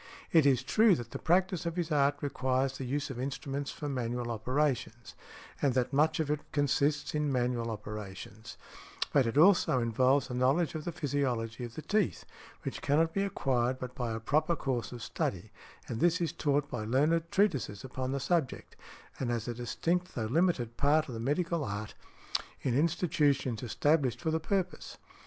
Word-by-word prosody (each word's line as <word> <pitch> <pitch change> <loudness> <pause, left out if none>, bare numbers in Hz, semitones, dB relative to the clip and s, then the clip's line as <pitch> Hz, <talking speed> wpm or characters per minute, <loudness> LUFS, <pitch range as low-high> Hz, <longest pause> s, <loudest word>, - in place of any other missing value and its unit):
It 160 -4 +6
is 135 -2 +3
true 215 - +5
that 120 -5 -7
the - - -5
practice 185 0 +1
of 170 - -3
his 170 -2 -2
art 145 -1 +3
requires 130 -1 0
the 135 - -5
use 140 +3 -2
of 125 - -6
instruments 140 +1 -3
for 150 - -5
manual 120 -3 -2
operations, 120 0 -1 0.5
and 135 -3 +2
that 130 +1 0
much 155 +4 +3
of 150 -2 0
it 150 0 -1
consists 145 0 +1
in 150 -1 0
manual 120 -2 0
operations; 105 +1 -7 0.6
but 135 -4 +4
it 115 - -2
also 175 -5 +5
involves 130 +4 +2
a 125 - -6
knowledge 130 +5 +2
of 155 -1 -5
the 175 - -2
physiology 130 -7 -2
of 120 - -10
the 155 - -6
teeth, 210 -3 0 0.4
which - - -4
cannot 160 +3 +2
be 195 - +1
acquired 130 -10 0
but 125 -1 -6
by 120 -3 -3
a 110 - -3
proper 155 +8 +1
course 130 -6 -2
of 120 -2 -7
study, - - -3 0.4
and 115 - -4
this 175 +4 +3
is 170 -2 -1
taught 145 -3 +1
by 120 -6 -4
learned 155 +9 +2
treatises 145 - +1
upon 130 0 -4
the 140 - -1
subject, 140 0 -1 0.4
and 130 - -1
as 120 -1 -2
a 120 - -2
distinct 170 +9 -2
though 110 - -1
limited 125 -4 +1
part 150 +2 +3
of - - -5
the 115 - -5
medical 160 +6 0
art, 105 -2 -4 0.7
in 125 -3 +1
institutions 145 - +1
established 130 +1 +1
for 160 - -1
the 160 - +1
purpose. 185 +2 -2
135 Hz, 180 wpm, -31 LUFS, 120-155 Hz, 0.7 s, It